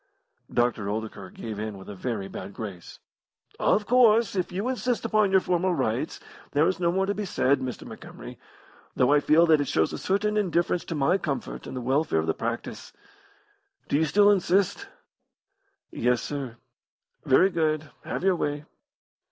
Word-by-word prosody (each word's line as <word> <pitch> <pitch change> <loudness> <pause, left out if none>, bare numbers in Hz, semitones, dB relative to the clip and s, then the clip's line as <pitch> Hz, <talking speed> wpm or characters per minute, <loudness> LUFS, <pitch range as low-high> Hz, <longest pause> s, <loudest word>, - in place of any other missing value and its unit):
Dr. 120 -4 0
Oldacre 105 -3 -5
gave 110 +2 -7
in 105 -1 -4
with 95 - -12
a 105 - -7
very 100 0 -4
bad 95 0 -8
grace. 100 -6 -8 0.6
"Of 210 - +2
course, 230 -3 +4
if 185 -2 -1
you 195 +6 -2
insist 250 -2 -1
upon 215 -2 +3
your 190 0 +4
formal 180 0 0
rights, 130 +2 -2 0.3
there 150 +3 +4
is 185 - -1
no 170 -1 +2
more 190 +2 +1
to 200 - -1
be 210 - -4
said, 140 -7 +1
Mr. 130 -2 -5
Montgomery, - - -10 0.6
though 130 +3 +3
I 150 - +5
feel 155 +3 +4
that 155 -3 +4
it 145 - -2
shows 80 -7 +1
a - - -4
certain 210 +2 0
indifference 175 -3 +1
to 165 - -4
my 150 +7 +2
comfort 145 -6 -4
and 130 - -6
the - - -3
welfare 135 - +1
of 80 - +1
the 80 - +1
practice. 115 +1 -5 1.0
Do - - +1
you 160 +2 +3
still 205 +7 +5
insist?" 195 0 +1 1.0
"Yes, 125 0 0
sir." 135 -5 -5 0.7
"Very 185 +9 +4
good. 155 -2 -1
Have - - -4
your 190 -1 +3
way." 145 -2 -3
155 Hz, 175 wpm, -26 LUFS, 120-190 Hz, 1.0 s, I